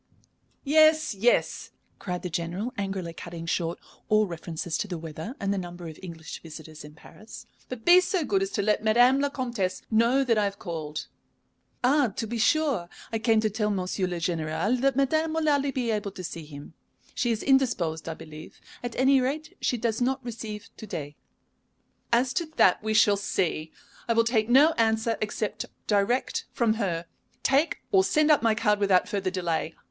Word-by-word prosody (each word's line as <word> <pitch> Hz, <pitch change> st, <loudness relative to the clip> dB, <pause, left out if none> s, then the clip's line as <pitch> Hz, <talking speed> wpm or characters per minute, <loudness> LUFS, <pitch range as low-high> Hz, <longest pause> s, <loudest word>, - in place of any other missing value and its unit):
"Yes, 310 Hz, 0 st, +4 dB
yes," 220 Hz, +5 st, +1 dB, 0.3 s
cried 180 Hz, -2 st, -4 dB
the 180 Hz, -, -3 dB
General, 175 Hz, +9 st, -3 dB
angrily 195 Hz, -4 st, -4 dB
cutting 170 Hz, 0 st, -8 dB
short 165 Hz, 0 st, -1 dB, 0.3 s
all 215 Hz, 0 st, +4 dB
references 170 Hz, -2 st, -5 dB
to -, -, -2 dB
the 180 Hz, -3 st, -4 dB
weather 160 Hz, -, -7 dB
and 200 Hz, 0 st, 0 dB
the 200 Hz, -, -1 dB
number 175 Hz, -1 st, -7 dB
of 155 Hz, -, -10 dB
English 165 Hz, -3 st, -8 dB
visitors 160 Hz, -1 st, -10 dB
in 150 Hz, 0 st, -12 dB
Paris. 215 Hz, +7 st, -13 dB, 0.2 s
"But 255 Hz, -3 st, -7 dB
be 355 Hz, +1 st, +8 dB
so 360 Hz, -3 st, -1 dB
good 390 Hz, +3 st, +1 dB
as 390 Hz, -, -1 dB
to 205 Hz, -, 0 dB
let 210 Hz, +1 st, +1 dB
Madame 245 Hz, +5 st, +5 dB
la 285 Hz, 0 st, +1 dB
Comtesse 235 Hz, -9 st, -3 dB
know 235 Hz, +5 st, +3 dB
that 230 Hz, -4 st, +2 dB
I 210 Hz, -, +2 dB
have 200 Hz, 0 st, -3 dB
called." 155 Hz, -5 st, -5 dB, 0.8 s
"Ah, 275 Hz, +2 st, +4 dB
to -, -, -2 dB
be 230 Hz, +1 st, -4 dB
sure! 270 Hz, -, +2 dB, 0.2 s
I 225 Hz, -, 0 dB
came 225 Hz, -1 st, +3 dB
to 215 Hz, -, +1 dB
tell 210 Hz, 0 st, -1 dB
Monsieur 185 Hz, -1 st, -1 dB
le 180 Hz, -, -3 dB
Général 170 Hz, +8 st, -1 dB
that 275 Hz, -1 st, +2 dB
madame 315 Hz, +4 st, +1 dB
will 320 Hz, -1 st, 0 dB
hardly 285 Hz, -1 st, +2 dB
be 250 Hz, -3 st, -1 dB
able 210 Hz, -2 st, -2 dB
to 185 Hz, -, -8 dB
see 165 Hz, -2 st, -6 dB
him. 145 Hz, +1 st, -11 dB, 0.4 s
She 240 Hz, -, 0 dB
is 225 Hz, -2 st, -1 dB
indisposed, 210 Hz, -, +1 dB
I 165 Hz, -, -4 dB
believe. 155 Hz, -1 st, -11 dB, 0.2 s
At 240 Hz, -1 st, -4 dB
any 265 Hz, +1 st, +4 dB
rate, 295 Hz, +5 st, -3 dB
she 245 Hz, -, 0 dB
does 225 Hz, 0 st, -1 dB
not 260 Hz, +1 st, 0 dB
receive 220 Hz, -3 st, -6 dB
to 220 Hz, -, -9 dB
day." 145 Hz, -5 st, -6 dB, 1.0 s
"As 245 Hz, +2 st, +2 dB
to 340 Hz, -3 st, -1 dB
that, 180 Hz, -, +4 dB
we 215 Hz, 0 st, -1 dB
shall 205 Hz, -1 st, +5 dB
see. 160 Hz, -5 st, -2 dB, 0.4 s
I 230 Hz, -, +2 dB
will 230 Hz, 0 st, +4 dB
take 230 Hz, -1 st, +1 dB
no 280 Hz, +6 st, +6 dB
answer 225 Hz, 0 st, +2 dB
except 215 Hz, 0 st, -3 dB, 0.2 s
direct 210 Hz, +5 st, +1 dB
from 235 Hz, -3 st, +2 dB
her. 170 Hz, -4 st, -1 dB, 0.4 s
Take 280 Hz, +5 st, +2 dB
or 385 Hz, -2 st, +5 dB
send 305 Hz, -4 st, +3 dB
up 295 Hz, -, +5 dB
my 225 Hz, -1 st, +3 dB
card 210 Hz, -2 st, +2 dB
without 195 Hz, -3 st, +3 dB
further 200 Hz, -3 st, -1 dB
delay. 170 Hz, -3 st, -2 dB
215 Hz, 190 wpm, -27 LUFS, 175-255 Hz, 1.0 s, be